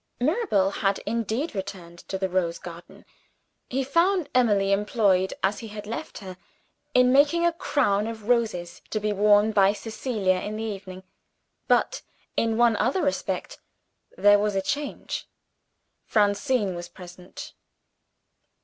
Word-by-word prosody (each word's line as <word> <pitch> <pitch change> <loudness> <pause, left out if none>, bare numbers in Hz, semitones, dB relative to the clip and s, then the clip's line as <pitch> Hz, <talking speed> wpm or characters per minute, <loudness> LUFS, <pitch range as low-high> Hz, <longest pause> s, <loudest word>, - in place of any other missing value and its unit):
Mirabel 255 - +1
had 195 -1 0
indeed 230 - -2
returned 190 -4 -7
to 190 - -2
the 190 0 -1
rose 175 -2 -1
garden. 170 0 -11 0.6
He 265 +2 -1
found 335 +3 +2
Emily 205 -6 +3
employed 195 -2 +2
as 195 +2 +1
he 225 - -8
had 210 -1 -8
left 230 +9 -6
her, 185 -2 -9 0.6
in 250 0 +5
making 295 +5 +4
a 340 - +3
crown 220 -10 +1
of 220 -2 -7
roses, 220 -8 0
to 215 - -1
be 210 0 -1
worn 205 +1 +4
by 200 -1 +4
Cecilia 215 -3 -1
in 210 +3 -5
the 220 - -4
evening. 195 -3 -6 0.6
But, - - +2 0.3
in 225 -1 +1
one 235 -1 +4
other 260 - +1
respect, 285 -1 -2 0.6
there 205 0 +6
was 210 -1 0
a 195 - +1
change. 290 +7 -4 0.8
Francine 205 0 +1
was 175 0 -7
present. 180 0 -11
210 Hz, 140 wpm, -25 LUFS, 195-245 Hz, 0.8 s, there